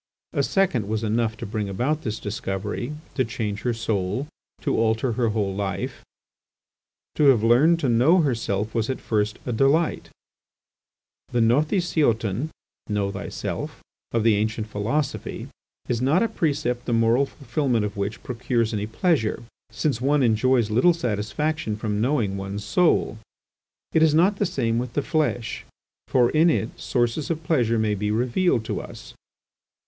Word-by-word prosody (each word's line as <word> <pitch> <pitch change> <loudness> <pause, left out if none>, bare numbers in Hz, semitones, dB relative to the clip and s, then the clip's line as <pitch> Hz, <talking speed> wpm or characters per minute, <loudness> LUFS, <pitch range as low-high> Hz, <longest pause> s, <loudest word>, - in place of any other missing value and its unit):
A - - +1
second 160 - +1
was 110 +1 -2
enough 110 +1 0
to - - -6
bring 105 0 -3
about 135 +10 -1
this 110 -1 -3
discovery, 105 +5 -4 0.2
to 130 - +1
change 110 -4 -4
her 125 - 0
soul, 110 +3 -2 0.3
to - - 0
alter 115 +2 +1
her 115 0 +1
whole 105 -3 -1
life. 100 -1 -4 1.1
To 150 - +2
have 130 -6 +5
learned 140 +9 +5
to 140 - +1
know 130 +10 +4
herself 110 -6 -1
was 115 +1 -1
at 130 - -2
first 105 0 -1
a 125 - -2
delight. 140 +8 +2 1.2
The 120 - +1
γυῶθί 130 - +1 0.4
σεαυτὸν 100 -1 -3 0.4
of 115 -2 +1
the 115 -2 +4
ancient 110 +1 -1
philosophy 110 +8 -3 0.4
is 120 -1 -1
not 150 - +3
a - - +2
precept 145 - -1
the 120 - -1
moral 115 +4 +3
fulfilment 130 -5 -1
of 105 +1 -5
which 100 +2 -4
procures 120 -2 -1
any 105 0 -2
pleasure, 120 - 0 0.3
since 120 +2 -1
one 140 +1 +3
enjoys 115 0 +2
little 145 +11 +4
satisfaction 115 +1 -2
from 105 -1 -2
knowing 115 -6 +1
one's 100 +1 -5
soul. 135 - +2 0.7
It 160 - +4
is 155 -1 +5
not 190 +5 +4
the 205 - +1
same 115 -10 0
with 125 -1 -4
the 145 - 0
flesh, 150 -7 -1 0.4
for 125 -2 +3
in 160 +3 +4
it 115 -7 0
sources 120 +4 -1
of 165 -1 -2
pleasure 120 -8 +2
may 110 -1 +1
be 105 +1 -2
revealed 120 - +1
to - - -3
us. - - -11
115 Hz, 155 wpm, -24 LUFS, 110-145 Hz, 1.2 s, have